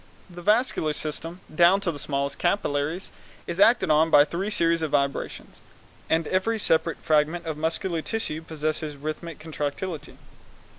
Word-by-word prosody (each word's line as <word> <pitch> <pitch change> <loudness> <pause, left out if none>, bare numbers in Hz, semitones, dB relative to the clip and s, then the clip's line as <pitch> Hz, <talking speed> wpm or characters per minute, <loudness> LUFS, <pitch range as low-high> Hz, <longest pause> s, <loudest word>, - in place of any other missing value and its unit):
The 175 0 -9
vascular 210 -6 +2
system, 165 +4 -4
down 175 +4 +5
to 185 -4 0
the 145 - -7
smallest 140 0 -2
capillaries, 165 -2 -1 0.3
is 170 +2 -5
acted 225 -4 +5
on 155 +2 +4
by 145 -2 +7
three 185 +6 -3
series 165 -4 +2
of 160 - -1
vibrations, 140 -1 -2 0.5
and 160 0 +2
every 205 +5 +1
separate 165 -5 +1
fragment 155 +3 +2
of 160 -2 -3
muscular 165 +2 -2
tissue 160 -6 -3
possesses 155 -1 -3
rhythmic 155 +3 -5
contractility. 155 +1 -5
160 Hz, 145 wpm, -25 LUFS, 150-175 Hz, 0.5 s, by